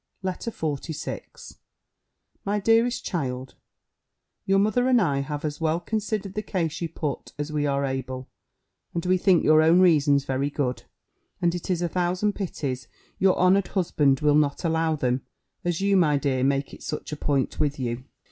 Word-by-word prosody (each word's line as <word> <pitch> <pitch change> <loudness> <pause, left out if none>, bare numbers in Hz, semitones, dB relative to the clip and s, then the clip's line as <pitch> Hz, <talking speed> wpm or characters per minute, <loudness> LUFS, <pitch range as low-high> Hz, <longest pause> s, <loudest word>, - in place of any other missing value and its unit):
LETTER 185 +4 -3
XLVI 155 - -5 0.9
My 205 +1 0
Dearest 230 +4 +2
Child, 130 -7 -3 0.9
Your 195 0 +4
mother 215 +5 +2
and 255 -2 +5
I 145 -9 +1
have 145 +2 -4
as 150 +1 -4
well 160 +1 +1
considered 210 +1 -3
the 215 - -2
case 175 -7 -2
you 170 - -2
put 150 -3 -4
as 150 +1 -4
we 150 -1 0
are 140 0 0
able; 130 -1 -4 0.7
and 170 - -2
we 185 0 +3
think 180 -2 +4
your 155 0 +6
own 165 +3 +5
reasons 145 -6 +4
very 135 +1 -1
good; 135 -3 -2 0.5
and 170 -1 +2
it 175 +1 -5
is 175 -1 0
a - - +1
thousand 180 +4 0
pities 135 - -4 0.3
your 190 -1 +4
honoured 185 +1 +4
husband 150 -8 +1
will 150 -1 +4
not 145 +1 +2
allow 160 -1 +1
them, 130 -3 0 0.4
as 175 0 -1
you, 200 0 +3
my 155 -6 +4
dear, 135 -2 0
make 135 +1 0
it - - -11
such 150 - -5
a - - -2
point 140 -2 -1
with 145 -1 0
you. 120 -1 -3
160 Hz, 175 wpm, -25 LUFS, 140-185 Hz, 0.9 s, your